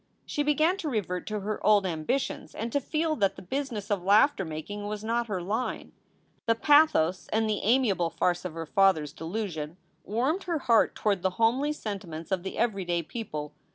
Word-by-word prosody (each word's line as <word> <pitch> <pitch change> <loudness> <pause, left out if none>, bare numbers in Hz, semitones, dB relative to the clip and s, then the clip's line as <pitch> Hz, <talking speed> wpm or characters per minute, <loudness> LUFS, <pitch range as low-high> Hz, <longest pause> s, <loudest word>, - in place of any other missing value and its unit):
She 295 - -2
began 310 +5 +2
to 320 -6 -3
revert 180 - -2
to 215 -1 -3
her 210 +2 -4
old 210 -2 +5
ambitions 180 - -2
and 230 +1 -4
to 285 - +1
feel 310 +3 0
that 195 -4 +2
the - - -10
business 230 -1 -4
of 200 -3 +1
laughter 205 +5 +4
making 185 +6 -6
was 210 0 -4
not 235 +1 0
her 190 -5 -3
line. 220 +7 -3 0.6
The 230 - +4
pathos 230 - +4
and 220 0 +1
the 210 -2 0
amiable 210 -7 +2
farce 175 +2 0
of 180 -3 -5
her 165 0 -4
father 190 -1 +3
s 145 - -7
delusion 165 -2 -4 0.3
warmed 265 - -1
her 340 -3 0
heart 235 -6 +3
toward 200 -4 0
the 190 - +2
homely 250 +6 +2
sentiments 195 - -6
of 190 -2 +1
the 190 - -6
everyday 190 -7 0
people. 150 -7 -6
210 Hz, 190 wpm, -28 LUFS, 180-245 Hz, 0.6 s, old